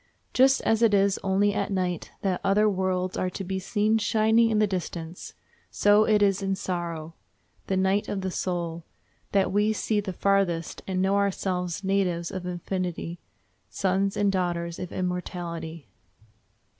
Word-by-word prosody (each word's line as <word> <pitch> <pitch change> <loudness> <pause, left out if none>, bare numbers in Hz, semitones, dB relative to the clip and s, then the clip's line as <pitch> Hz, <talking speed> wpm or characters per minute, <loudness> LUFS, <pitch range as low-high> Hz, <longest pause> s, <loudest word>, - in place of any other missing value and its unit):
Just 265 +1 +5
as 225 0 +1
it 225 -3 +5
is 200 0 +3
only 200 +1 +2
at 205 - -2
night 180 -3 -2
that 190 -2 0
other 205 +2 +3
worlds 185 -2 0
are 185 - 0
to 195 - -6
be 190 +1 -3
seen 210 +3 +1
shining 220 +2 +3
in 220 - +1
the 215 - +4
distance, 175 -3 -5 0.3
so 205 +1 +4
it 210 -1 +4
is 195 -1 +2
in 195 0 0
sorrow—the 170 +1 -6
night 190 +2 +1
of 195 - -2
the 190 0 -2
soul—that 175 +2 -3
we 210 +2 +2
see 215 0 0
the 200 -2 -3
farthest, 185 -3 0
and 185 -1 0
know 195 +1 +2
ourselves 185 -2 -1
natives 185 -3 0
of 185 -1 -5
infinity, 175 -1 -4 0.5
sons 195 +1 0
and 205 -1 +3
daughters 175 -2 -2
of 180 - -6
immortality. 170 -3 -4
190 Hz, 150 wpm, -26 LUFS, 180-200 Hz, 0.5 s, Just